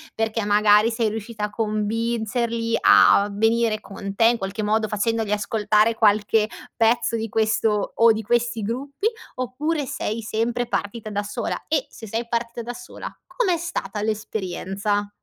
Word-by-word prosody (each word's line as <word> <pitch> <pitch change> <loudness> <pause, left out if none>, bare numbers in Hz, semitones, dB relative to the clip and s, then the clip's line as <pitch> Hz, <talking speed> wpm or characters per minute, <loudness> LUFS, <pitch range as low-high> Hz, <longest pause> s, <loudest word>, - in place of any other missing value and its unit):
Perché 220 -1 -1
magari 210 +2 +4
sei 225 -1 0
riuscita 220 0 -4
a - - -5
convincerli 230 +2 -1
a 200 +1 +6
venire 225 +1 +1
con 200 0 -7
te, 225 - +4
in 235 0 +3
qualche 195 +1 -4
modo, 215 +1 +1
facendogli 220 0 -1
ascoltare 215 +1 +2
qualche 215 0 +3 0.3
pezzo 230 0 +2
di 225 0 -3
questo 215 -1 +1
o 230 0 +6
di 220 - -3
questi 240 +1 0
gruppi. 275 - -2 0.3
Oppure 285 +5 -2
sei 230 -2 -3
sempre 235 +3 -1
partita 215 +1 -3
da 205 0 -2
sola? 205 - -4
E - - 0
se 220 - -11
sei 225 +3 -2
partita 235 0 -2
da 240 +1 -5
sola, 245 0 -8 0.2
com'è 380 -9 0
stata 330 -10 -4
l'esperienza? 205 -1 -2
220 Hz, 150 wpm, -23 LUFS, 210-235 Hz, 0.3 s, a